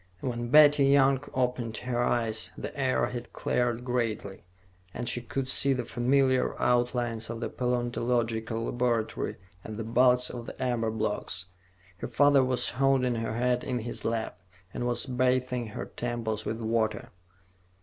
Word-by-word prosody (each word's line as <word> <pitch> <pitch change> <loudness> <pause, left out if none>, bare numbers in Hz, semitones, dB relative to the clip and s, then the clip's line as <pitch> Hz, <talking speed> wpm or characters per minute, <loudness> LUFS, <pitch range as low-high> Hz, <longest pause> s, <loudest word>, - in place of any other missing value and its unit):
When 120 -2 -3
Betty 145 0 +7
Young 135 -1 +4
opened 125 -3 -1
her 120 -1 -2
eyes, 115 -2 0
the - - -6
air 130 -2 +1
had 120 -1 -7
cleared 120 0 -1
greatly, 115 -6 -2 0.5
and 120 0 -4
she 120 -1 +1
could 130 +2 -3
see 135 +1 +3
the 125 -2 -3
familiar 130 +2 +1
outlines 120 -2 +1
of 115 -1 -4
the - - -3
paleontological 120 -2 -1
laboratory 120 -3 -1 0.3
and 110 -1 -7
the 115 - -3
bulks 125 +2 +3
of 120 -1 -7
the - - -9
amber 120 -3 0
blocks. 105 -4 -3 0.5
Her - - -5
father 145 -1 +4
was 125 -1 +1
holding 130 -1 +2
her 115 -1 -3
head 125 0 +1
in 125 -2 -2
his 120 0 -5
lap, 110 -5 -2 0.3
and 120 - -2
was 120 - +1
bathing 125 -1 0
her 105 - -6
temples 115 -3 -3
with 110 +1 -3
water. 110 -1 -1
120 Hz, 150 wpm, -28 LUFS, 115-130 Hz, 0.5 s, Betty